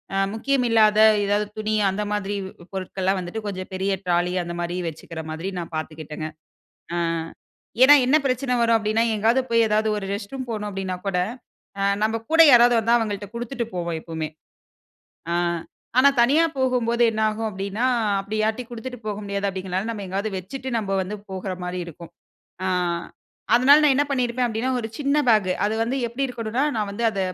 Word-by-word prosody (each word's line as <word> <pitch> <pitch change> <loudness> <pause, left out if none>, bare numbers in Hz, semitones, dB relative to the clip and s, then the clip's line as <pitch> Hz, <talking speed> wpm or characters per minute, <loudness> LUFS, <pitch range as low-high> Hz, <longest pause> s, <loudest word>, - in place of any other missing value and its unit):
அ - - +1 0.2
முக்கியம் 270 +2 +1
இல்லாத 215 -2 +4 0.3
ஏதாவது 205 +1 +1
துணி 215 0 -1
அந்த 195 +2 -2
மாதிரி 205 0 -2 0.4
பொருட்கள்லாம் 190 0 -1
வந்துட்டு 210 +5 -6
கொஞ்சம் 185 -2 -5
பெரிய 195 +1 0
ட்ராலி 175 0 +1
அந்தமாரி 175 +1 -4
வச்சுக்கிற 160 +1 -8
மாதிரி 165 +4 -4
நான் 170 -1 -6
பார்த்துக்கிட்டேங்க. 155 0 -6 0.7
அ - - -1 0.9
ஏனா, 280 +3 +9
என்ன 260 +4 +4
பிரச்சன 255 -1 0
வரும் 230 -1 +4
அப்பிடின்னா, 220 +1 +1
எங்காவது 225 +5 +3
போய், 230 0 +4
எதாவது 215 0 +1
ஒரு 200 - -4
ரெஸ்ட் 200 0 -6
ரூம் 260 -2 -5
போணும் 210 -2 -3
அப்பிடின்னா 190 -2 -3
கூட, 195 -2 0 0.6
அ - - -1 0.2
நம்ம 220 +1 +1
கூட 325 0 +7
யாராவது 240 -2 +7
வந்தா 230 +2 +3
அவங்கள்ட்ட 205 -3 -3
குடுத்துட்டு 240 +1 -4
போவோம் 170 -2 -2
எப்பவுமே! 160 -1 -4 1.0
ஆ. - - +1 0.6
ஆனா, 270 +2 +7
தனியா 280 +7 +4
போகும்போது 245 -2 +1
என்ன 220 0 -2
ஆகும் 220 +1 -3
அப்பிடின்னா, 200 +4 -3 0.3
அப்பிடி 200 +2 -4
யார்டையும் 225 +3 -2
குடுத்துட்டு 250 +2 -7
போக 210 - -2
முடியாது 200 0 -2
அப்பிடிங்கிறனால 190 +2 -3
நம்ம 205 -3 -6
எங்காவது 200 +3 -2
வச்சுட்டு 260 +8 -6
நம்ம 210 -3 -3
வந்து 195 +3 -5
போகுற 190 0 -4
மாரி 180 0 -3
இருக்கும். 170 0 -11 0.6
ஆ. - - +1 0.9
அதனால 270 +4 +7
நான் 280 -3 +5
என்ன 290 +1 +2
பண்ணியிருப்பன் 250 -1 0
அப்பிடின்னா, 230 +3 -1
ஒரு 220 - -5
சின்ன 280 -1 0 0.2
பேக். 200 -4 +3
அது 220 - -1
வந்து 255 +4 -2
எப்பிடி 265 +4 -2
இருக்கணுனா, 240 +2 -2
நான் 210 -2 -1
வந்து 235 +4 -3
அத 200 - -2
215 Hz, 170 wpm, -23 LUFS, 190-240 Hz, 1.0 s, ஏனா